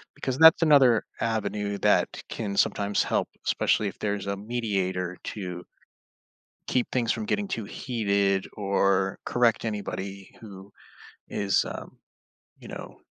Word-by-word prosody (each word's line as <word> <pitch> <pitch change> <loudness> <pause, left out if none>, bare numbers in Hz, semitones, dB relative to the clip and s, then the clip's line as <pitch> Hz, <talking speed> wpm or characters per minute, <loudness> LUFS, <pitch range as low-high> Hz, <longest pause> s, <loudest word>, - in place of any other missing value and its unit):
because 130 -1 -3
that's 160 +2 +8
another 135 -7 +5 0.2
avenue 105 -2 -1
that - - +2
can 105 -4 -4
sometimes 100 0 +2
help, - - 0 0.2
especially 105 - +2
if - - -14
there's 100 -2 -2
a 100 0 -2
mediator 95 -5 -2
to 90 -4 -6 1.0
keep 125 -2 +1
things 120 -3 +1
from 110 - -3
getting 205 - -1
too 115 - -3
heated 100 -4 0
or 100 -1 +1
correct 120 -2 +2
anybody 100 -2 -5
who 100 -2 -11 0.6
is, 100 -1 +1
um, - - -8 0.6
you - - -12
know, - - -8
105 Hz, 130 wpm, -26 LUFS, 100-115 Hz, 1.0 s, that's